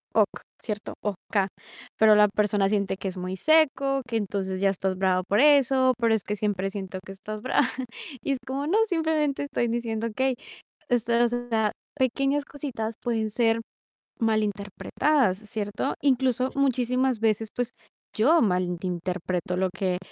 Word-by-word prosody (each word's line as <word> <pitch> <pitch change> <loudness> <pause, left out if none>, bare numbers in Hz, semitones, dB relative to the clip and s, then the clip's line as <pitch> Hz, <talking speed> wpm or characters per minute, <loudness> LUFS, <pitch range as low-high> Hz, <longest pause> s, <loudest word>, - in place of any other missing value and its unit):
"Ok", - - +2 0.2
¿cierto? 210 -2 -4
O-K, 200 -1 -1 0.5
pero 220 -1 +7
la 210 0 +6
persona 205 -1 +1
siente 200 -2 0
que 195 - -5
es 185 - -8
muy 185 +1 -4
seco, 275 - +3
que 230 -2 -1
entonces 195 -2 -2
ya 200 - +4
estás 190 -1 -2
brava 185 -1 +2
por 205 - +2
eso. 270 -2 +5
Pero 230 -1 +3
es 220 - -2
que 210 - -3
siempre 195 -2 -1
siento 190 -1 -5
que - - -8
estás 210 +2 -7
brava 255 0 +2 0.6
y 280 - -1
es 265 - -3
como: 270 +2 -2
"No, 390 - +2
simplemente 315 -6 0
estoy 240 -4 -1
diciendo 230 -1 -2
okey". 260 +4 0 0.6
Estas, 235 0 +2
o 245 0 -3
sea, 220 -2 +2 0.3
pequeñas 275 +3 +1
cositas 235 -7 -5
pueden 225 -2 0
ser 230 0 +2 0.6
malinterpretadas, 215 +3 +1
¿cierto? 210 +3 -3
Incluso 260 -2 +2
muchísimas 255 -2 +1
veces, 220 0 +1
pues 245 -1 -1 0.5
yo 305 +10 +5
malinterpreto 180 -1 -1
lo 190 0 +1
que 180 -1 0
225 Hz, 150 wpm, -26 LUFS, 200-260 Hz, 0.6 s, pero